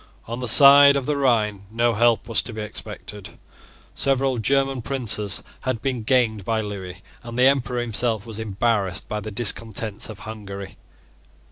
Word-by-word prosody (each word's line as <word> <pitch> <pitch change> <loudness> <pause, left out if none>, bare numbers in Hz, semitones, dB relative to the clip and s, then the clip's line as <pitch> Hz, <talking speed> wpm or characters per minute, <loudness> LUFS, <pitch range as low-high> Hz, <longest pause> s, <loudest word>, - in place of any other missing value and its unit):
On 115 +2 -6
the 125 - -4
side 140 +3 +8
of 140 -2 -1
the 150 - -1
Rhine 105 -7 0
no 115 +2 +1
help 115 0 +2
was 115 - +2
to 120 - -7
be 110 - -5
expected. 105 -1 -9 0.6
Several 135 -2 0
German 135 +2 +1
princes 110 -6 0 0.2
had 130 -3 -3
been 130 0 -2
gained 110 -3 +1
by 110 +3 -1
Lewis; 100 -4 -6 0.2
and 120 0 -8
the 125 - +3
Emperor 125 -3 +1
himself 115 -2 -2
was 110 -2 -8
embarrassed 105 -3 -1
by 105 - -3
the 105 +1 -7
discontents 110 -1 -1
of 105 -2 -10
Hungary. 100 -3 -8
115 Hz, 160 wpm, -22 LUFS, 105-125 Hz, 0.6 s, side